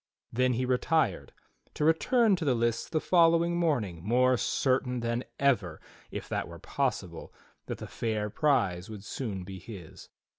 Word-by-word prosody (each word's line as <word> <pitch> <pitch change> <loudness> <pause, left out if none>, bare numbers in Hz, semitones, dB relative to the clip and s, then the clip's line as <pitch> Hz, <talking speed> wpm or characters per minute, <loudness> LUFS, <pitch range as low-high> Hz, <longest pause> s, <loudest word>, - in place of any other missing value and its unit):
Then 125 +1 +2
he 125 +2 0
retired, 125 - +1 0.4
to 150 - 0
return 215 - +4
to 175 - -4
the 135 -5 +2
lists 115 0 0
the 155 - +1
following 170 0 +4
morning 120 - 0
more 125 +5 +3
certain 125 0 0
than 115 +1 -1 0.2
ever, 105 - +1 0.3
if - - -6
that - - -2
were - - -10
possible, - - -3 0.4
that - - -4
the - - -7
fair 110 -2 -2
prize 100 - +1
would 105 -3 -8
soon 105 -5 -4
be 95 0 -8
his. 95 -4 -11
125 Hz, 155 wpm, -29 LUFS, 105-150 Hz, 0.4 s, return